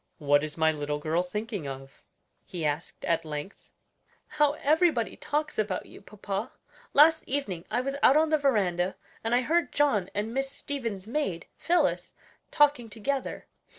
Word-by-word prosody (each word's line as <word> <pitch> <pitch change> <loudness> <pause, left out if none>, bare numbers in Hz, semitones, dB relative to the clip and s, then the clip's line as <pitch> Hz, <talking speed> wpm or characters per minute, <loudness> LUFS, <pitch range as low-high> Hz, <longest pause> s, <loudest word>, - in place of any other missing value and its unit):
"What 145 -2 +3
is 155 0 -5
my 160 0 +4
little 145 -1 -3
girl 155 +3 0
thinking 205 - -4
of?" 135 0 -9 0.4
he 170 -3 -5
asked 150 +3 -3
at 165 - +1
length. 150 +4 -7 0.6
"How 295 -1 +2
everybody 305 -4 +2
talks 300 -3 -2
about 205 -3 -1
you, - - -13
papa; 205 +2 -5 0.4
last 315 +2 +6
evening 205 -12 -2
I 240 +3 0
was 275 +2 -3
out 275 - +6
on 315 0 +3
the 310 - +3
veranda, 190 -9 +1 0.3
and 225 +2 +2
I 250 - +3
heard 335 +6 +1
John 220 -11 +2
and 210 +3 -2
Miss 270 +1 -1
Stevens' 235 -9 -4
maid, 220 - -2
Phillis, 335 -4 +1 0.4
talking 285 -6 +3
together. 255 +6 -3
220 Hz, 155 wpm, -28 LUFS, 175-285 Hz, 0.6 s, last